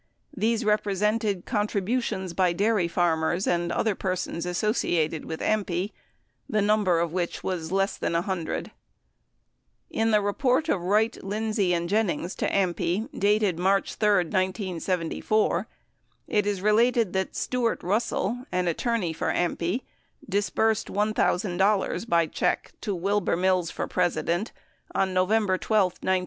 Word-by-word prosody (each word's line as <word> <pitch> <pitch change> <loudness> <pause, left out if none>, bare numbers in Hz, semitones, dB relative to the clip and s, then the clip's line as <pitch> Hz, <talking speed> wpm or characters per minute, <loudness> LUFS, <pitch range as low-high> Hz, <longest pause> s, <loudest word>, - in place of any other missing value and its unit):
These 225 +3 +1
repre 210 -2 +1
sented 210 -2 0
contributions 205 -2 -1
by 180 -1 +2
dairy 200 -1 +2
farmers 170 +1 +1
and 175 0 0
other 220 - +1
persons 180 -2 -3
associated 175 -5 0
with 160 - -5
AMPI, 200 -2 0 0.6
the 215 -4 +1
number 205 -5 +3
of 170 -1 -1
which 180 -2 -2
was 170 -3 -3
less 195 +1 +1
than - - -2
100. 175 -1 -2 1.2
In 225 0 +1
the 210 -1 +4
report 250 +9 +1
of 180 - +1
Wright, 210 +6 +1
Lindsey, 210 -1 0
and 170 0 -2
Jennings 185 -3 0
to - - 0
AMPI, 185 +3 0
dated 205 -3 +2
March 195 +2 +1
13, 200 -6 +2
1974, 185 +1 0 0.6
it 210 -1 +1
is 200 -2 -1
related 225 -1 +3
that 190 0 -2
Stuart 245 -2 -1
Russell, 220 +4 -1
an 180 0 0
attorney 185 0 0
for - - -3
AMPI, 175 +5 -1 0.5
disbursed 205 +2 +1
$1,000 205 0 +1
by 170 -3 +4
check - - -1
to 205 -4 -2
Wilbur 200 +2 0
Mills 185 -2 +2
for - - -3
President 175 +2 0 0.4
on 190 -1 +1
November 185 +1 +2
12, 215 -1 +2 0.2
1971. 190 0 +2
195 Hz, 130 wpm, -26 LUFS, 175-215 Hz, 1.2 s, the